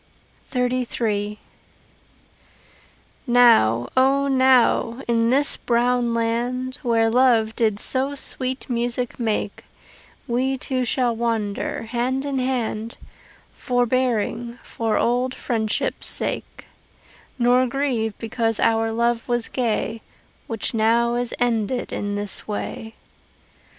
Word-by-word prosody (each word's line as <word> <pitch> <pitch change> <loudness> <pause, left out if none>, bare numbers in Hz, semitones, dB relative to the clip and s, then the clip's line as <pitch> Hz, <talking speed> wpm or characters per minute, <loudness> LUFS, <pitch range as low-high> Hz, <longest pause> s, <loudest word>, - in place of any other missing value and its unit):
XXXIII 235 -5 -1 1.9
Now, 225 - +5
O 270 +2 +3
now, 260 -2 +3
in 230 -1 +2
this 280 +3 +3
brown 240 0 +1
land 245 +3 -2
Where 230 -4 +2
Love 225 -2 +3
did 215 -3 +1
so 270 +4 0
sweet 260 -1 -2
music 245 0 -2
make 215 -3 -2 0.6
We 260 +3 0
two 255 -1 -2
shall 245 -1 0
wander, 225 -3 -2
hand 250 +4 -2
in 275 -2 -1
hand, 235 -3 -2 0.6
Forbearing 245 -1 -1
for 225 -2 -2
old 250 +2 +1
friendship' 220 -3 -1
sake, - - -3 0.7
Nor 250 +1 +3
grieve 240 -5 -1
because 225 -1 -1
our 225 0 +2
love 235 +1 0
was 240 -2 -1
gay 225 -2 -1 0.5
Which 225 0 -3
now 230 +2 +2
is 240 -1 -1
ended 240 0 -1
in 205 0 -3
this 205 -1 -4
way. 220 +1 -5
235 Hz, 105 wpm, -22 LUFS, 225-255 Hz, 1.9 s, Now